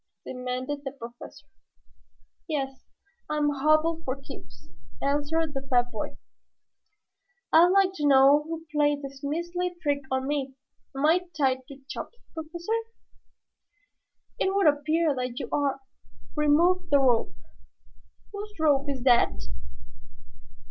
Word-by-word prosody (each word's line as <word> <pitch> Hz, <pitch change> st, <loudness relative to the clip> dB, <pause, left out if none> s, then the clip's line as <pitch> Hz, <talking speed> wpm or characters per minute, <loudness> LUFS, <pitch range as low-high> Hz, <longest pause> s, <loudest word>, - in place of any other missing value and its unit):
demanded 255 Hz, +3 st, -4 dB
the 270 Hz, -, -3 dB
Professor. 240 Hz, -3 st, -11 dB, 1.0 s
"Yes, 270 Hz, -4 st, -3 dB, 0.4 s
I'm 300 Hz, -1 st, +1 dB
hobbled 310 Hz, +3 st, +2 dB
for 260 Hz, +1 st, -3 dB
keeps," 60 Hz, -, -13 dB, 0.3 s
answered 295 Hz, +2 st, 0 dB
the 270 Hz, -, -3 dB
fat 245 Hz, -2 st, +2 dB
boy. -, -, -5 dB, 1.4 s
"I'd 330 Hz, +2 st, +8 dB
like 380 Hz, 0 st, +3 dB
to 295 Hz, -, +1 dB
know 275 Hz, +1 st, +6 dB
who 325 Hz, +1 st, -6 dB
played 295 Hz, -1 st, +2 dB
this 275 Hz, 0 st, -9 dB
measly 345 Hz, +4 st, -2 dB
trick 285 Hz, -3 st, 0 dB
on 260 Hz, 0 st, -1 dB
me. 275 Hz, -2 st, -2 dB, 0.4 s
Am 275 Hz, -, +1 dB
I 355 Hz, +3 st, +3 dB
tied 260 Hz, -3 st, +1 dB
to 275 Hz, -1 st, -12 dB
Chops, 475 Hz, -, -7 dB, 0.2 s
Professor?" 335 Hz, +5 st, -5 dB, 1.7 s
"It 385 Hz, +1 st, +1 dB
would 400 Hz, -, +3 dB
appear 305 Hz, +2 st, +3 dB
that 250 Hz, -1 st, -3 dB
you -, -, -4 dB
are. 280 Hz, -1 st, 0 dB, 0.6 s
Remove 320 Hz, +5 st, +3 dB
the 285 Hz, -, +5 dB
rope. 245 Hz, -4 st, +2 dB, 1.0 s
Whose 415 Hz, +1 st, -7 dB
rope 290 Hz, -2 st, +3 dB
is 265 Hz, -3 st, -3 dB
that?" 245 Hz, -2 st, +5 dB
290 Hz, 120 wpm, -27 LUFS, 270-320 Hz, 1.7 s, I'd